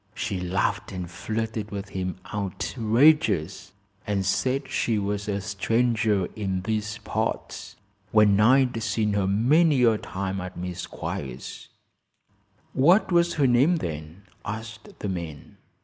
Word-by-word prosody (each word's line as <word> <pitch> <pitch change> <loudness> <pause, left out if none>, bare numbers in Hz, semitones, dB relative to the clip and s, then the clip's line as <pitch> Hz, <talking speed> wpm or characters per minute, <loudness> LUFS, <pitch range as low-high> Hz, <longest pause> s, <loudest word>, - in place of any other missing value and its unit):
She 95 -3 -2
laughed 90 +1 -1
and 90 -2 -5
flirted 110 +4 -4
with 100 -1 -6
him 95 -2 -3 0.2
outrageous, 110 - +1 0.4
and 100 -2 0
said 130 +8 0
she 115 -2 0
was 105 +1 -2
a 100 -1 -1
stranger 110 0 +1
in 95 -3 -2
these 105 0 -2
parts, - - -3 0.4
when 105 -2 +5
I'd 125 +1 +4
seen 110 -2 0
her 100 -2 +1
many 130 - +4
a 115 -3 +4
time 95 0 -4
at 90 0 -7
Miss 90 0 -5
Squiers's." 65 -2 -6 1.1
"What 175 +10 +4
was 170 0 +3
her 145 - +3
name 130 +8 +4
then?" 80 - -6 0.2
asked 110 -1 -7
the - - -4
man. 85 -6 -6
105 Hz, 130 wpm, -25 LUFS, 95-115 Hz, 1.1 s, when